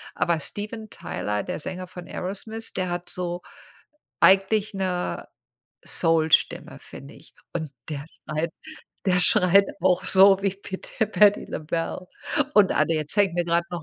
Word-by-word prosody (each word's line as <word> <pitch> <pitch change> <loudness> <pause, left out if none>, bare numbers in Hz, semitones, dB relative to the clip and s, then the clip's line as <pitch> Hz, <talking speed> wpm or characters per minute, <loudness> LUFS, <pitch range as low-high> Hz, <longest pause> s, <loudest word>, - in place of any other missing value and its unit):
aber 170 -2 +1
Steven 215 +6 -5
Tyler, 105 0 -3
der - - -4
Sänger 185 +3 -6
von 180 -1 -10
Aerosmith, 220 +4 -5
der 185 -1 -1
hat 175 0 -4
so 175 -1 -3 0.8
eigentlich 200 +2 +4
'ne 185 -2 -2 0.6
Soul-Stimme, 165 -2 +1
finde - - -12
ich. - - -17 0.2
Und 155 -3 -3 0.2
der 145 0 -5 0.2
schreit 155 +2 -2 0.5
der 180 -1 +3
schreit 185 +3 +5 0.2
auch 180 +1 +3
so 195 +1 +6
wie 195 - +2
pit 190 -1 -8 0.2
Patti 205 -1 +5
LaBelle. 165 +3 -4 0.5
Und 200 -3 +5
ah, - - +3
der 155 -2 -1
zeigt 200 -4 +2
mir 175 - 0
grad 170 0 +1
noch 175 -2 -5
180 Hz, 145 wpm, -24 LUFS, 170-195 Hz, 0.8 s, so